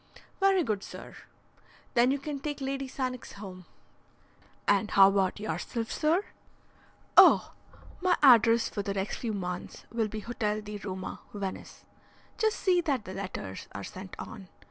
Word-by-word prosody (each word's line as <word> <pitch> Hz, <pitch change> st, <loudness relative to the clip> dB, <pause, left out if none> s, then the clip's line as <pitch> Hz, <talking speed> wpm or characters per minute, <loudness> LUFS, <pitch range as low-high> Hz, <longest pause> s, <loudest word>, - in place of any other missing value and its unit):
"Very 390 Hz, -2 st, +4 dB
good, 215 Hz, -7 st, -1 dB
sir." -, -, -10 dB, 0.8 s
"Then 240 Hz, 0 st, +4 dB
you 275 Hz, -, +2 dB
can 285 Hz, 0 st, -5 dB
take 290 Hz, +1 st, -4 dB
Lady 270 Hz, 0 st, -3 dB
Sannox 255 Hz, -2 st, -4 dB
home." 185 Hz, -3 st, -9 dB, 1.0 s
"And 205 Hz, +1 st, +3 dB
how 195 Hz, 0 st, +7 dB
about 195 Hz, 0 st, +1 dB
yourself, 215 Hz, +5 st, -3 dB
sir?" 330 Hz, +6 st, +1 dB, 0.9 s
"Oh, -, -, +7 dB, 0.5 s
my 360 Hz, -2 st, +3 dB
address 230 Hz, -3 st, +7 dB
for 205 Hz, -, -3 dB
the 200 Hz, 0 st, -3 dB
next 195 Hz, +1 st, -2 dB
few 230 Hz, -, -3 dB
months 180 Hz, -3 st, -5 dB
will 230 Hz, -2 st, 0 dB
be 215 Hz, 0 st, -6 dB
Hotel 215 Hz, -2 st, -2 dB
di 210 Hz, 0 st, -6 dB
Roma, 190 Hz, -2 st, -6 dB, 0.2 s
Venice. 195 Hz, -2 st, -6 dB, 0.5 s
Just 440 Hz, 0 st, +2 dB
see 360 Hz, -2 st, +3 dB
that 275 Hz, -9 st, -1 dB
the 185 Hz, -, -7 dB
letters 185 Hz, -, -6 dB
are 100 Hz, -, -6 dB
sent 185 Hz, -, -8 dB
on. 200 Hz, -4 st, -8 dB
220 Hz, 150 wpm, -29 LUFS, 195-270 Hz, 1.0 s, how